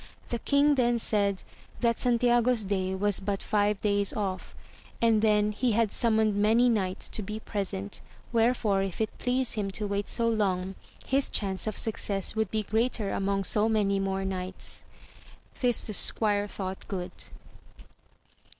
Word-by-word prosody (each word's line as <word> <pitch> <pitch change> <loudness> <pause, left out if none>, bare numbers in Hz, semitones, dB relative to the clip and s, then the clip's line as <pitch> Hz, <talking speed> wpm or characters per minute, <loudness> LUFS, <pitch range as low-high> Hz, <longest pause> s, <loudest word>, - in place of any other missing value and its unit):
The 235 - -2
king 285 +3 +3
then 240 -3 +2
said, 200 -4 0 0.4
that 235 -2 +1
Santiago's 240 -1 +2
day 190 -1 -1
was 205 0 0
but 195 0 -3
five 205 -1 +1
days 200 -1 +1
off, 195 -3 -4 0.4
and 225 -2 +3
then 210 -1 +3
he 235 +2 0
had 225 -1 +2
summoned 220 -3 +2
many 225 +4 +4
knights 195 -4 -1
to - - -1
be 210 +2 -5
present, 190 - -3 0.3
wherefore 225 -4 +2
if 195 -2 -4
it 220 -1 -2
pleased 255 0 0
him 205 -3 -2
to 210 +2 -4
wait 200 0 -2
so 230 - 0
long, 195 -4 0 0.3
his 270 +1 +1
chance 195 0 0
of 215 - -3
success 205 -3 0
would 220 -2 0
be 215 +1 -1
greater 220 -1 0
among 195 0 -1
so 210 +3 +2
many 200 -3 +1
more 195 0 -2
knights. 185 -1 -5 0.8
This 245 -3 +3
the 215 - -4
squire 205 +1 +2
thought 190 -2 -6
good. 180 -3 -4
210 Hz, 155 wpm, -28 LUFS, 195-230 Hz, 0.8 s, many